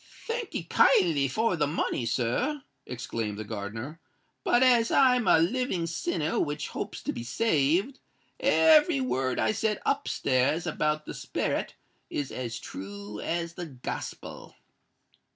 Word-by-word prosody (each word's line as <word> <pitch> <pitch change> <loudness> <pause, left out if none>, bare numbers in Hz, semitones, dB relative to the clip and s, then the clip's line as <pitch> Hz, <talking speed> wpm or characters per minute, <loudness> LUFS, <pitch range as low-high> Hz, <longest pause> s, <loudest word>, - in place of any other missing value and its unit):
"Thank'ee 460 - -3
kindly 160 -3 +4
for 220 - +1
the 150 -3 +1
money, 140 -5 -1
sir," 190 - -1 0.2
exclaimed 115 -4 -4
the 110 - -4
gardener; 110 +8 -6 0.4
"but 240 - +4
as 240 -3 +5
I'm 250 -3 +4
a - - +7
living 185 +1 0
sinner 165 -1 -1
which 150 0 -2
hopes - - -5
to - - -2
be 115 - -5
saved, 170 - +1 0.4
every 310 -1 +5
word 130 - -1
I - - +2
said 215 -1 -1
up 280 +1 0
stairs 135 +5 +1
about 150 0 -1
the - - -6
sperret - - -2 0.3
is 145 -2 -3
as 120 -3 -4
true 100 +2 -8
as 170 0 -2
the 175 -1 -6
Gospel." 130 -4 -7
155 Hz, 135 wpm, -28 LUFS, -, 0.4 s, a